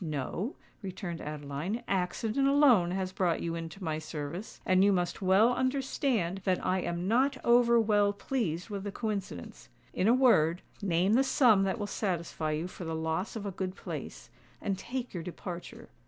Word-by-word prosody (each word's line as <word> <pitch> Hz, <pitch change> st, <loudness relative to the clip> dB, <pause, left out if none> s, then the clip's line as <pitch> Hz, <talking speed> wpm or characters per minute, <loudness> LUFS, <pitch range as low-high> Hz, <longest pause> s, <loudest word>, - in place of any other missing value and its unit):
"No," 160 Hz, -, -3 dB, 0.3 s
returned 180 Hz, -4 st, -5 dB
Adeline: 150 Hz, +9 st, -4 dB
"accident 215 Hz, +8 st, 0 dB
alone 270 Hz, -11 st, +5 dB
has 185 Hz, 0 st, -2 dB
brought 180 Hz, -3 st, 0 dB
you 170 Hz, -, -3 dB
into 165 Hz, +3 st, -6 dB
my 155 Hz, -2 st, -1 dB
service: 155 Hz, +5 st, -6 dB
and 185 Hz, +1 st, +4 dB
you 200 Hz, -, +5 dB
must 180 Hz, 0 st, -1 dB
well 195 Hz, +6 st, +5 dB
understand 255 Hz, -7 st, 0 dB
that 185 Hz, -2 st, 0 dB
I 185 Hz, +1 st, +2 dB
am 175 Hz, +1 st, -3 dB
not 260 Hz, +5 st, +2 dB
over 235 Hz, 0 st, +5 dB
well 205 Hz, -2 st, +3 dB
pleased 200 Hz, -4 st, -3 dB
with 200 Hz, -1 st, -4 dB
the 205 Hz, -, -4 dB
coincidence. 200 Hz, -, -5 dB, 0.2 s
In 185 Hz, -, +1 dB
a 230 Hz, -, +6 dB
word, 180 Hz, -10 st, +4 dB, 0.2 s
name 185 Hz, +1 st, +2 dB
the 260 Hz, +4 st, +5 dB
sum 235 Hz, -7 st, +4 dB
that 195 Hz, +3 st, -1 dB
will 210 Hz, -, -3 dB
satisfy 170 Hz, -6 st, -2 dB
you 160 Hz, +3 st, -2 dB
for 185 Hz, -, -9 dB
the 165 Hz, -1 st, -3 dB
loss 160 Hz, +6 st, -2 dB
of 215 Hz, -2 st, -5 dB
a 200 Hz, -, -2 dB
good 185 Hz, 0 st, -4 dB
place—and 200 Hz, -2 st, -7 dB
take 250 Hz, +4 st, -5 dB
your 175 Hz, -, -4 dB
departure. 175 Hz, +1 st, -8 dB
190 Hz, 170 wpm, -30 LUFS, 170-225 Hz, 0.3 s, a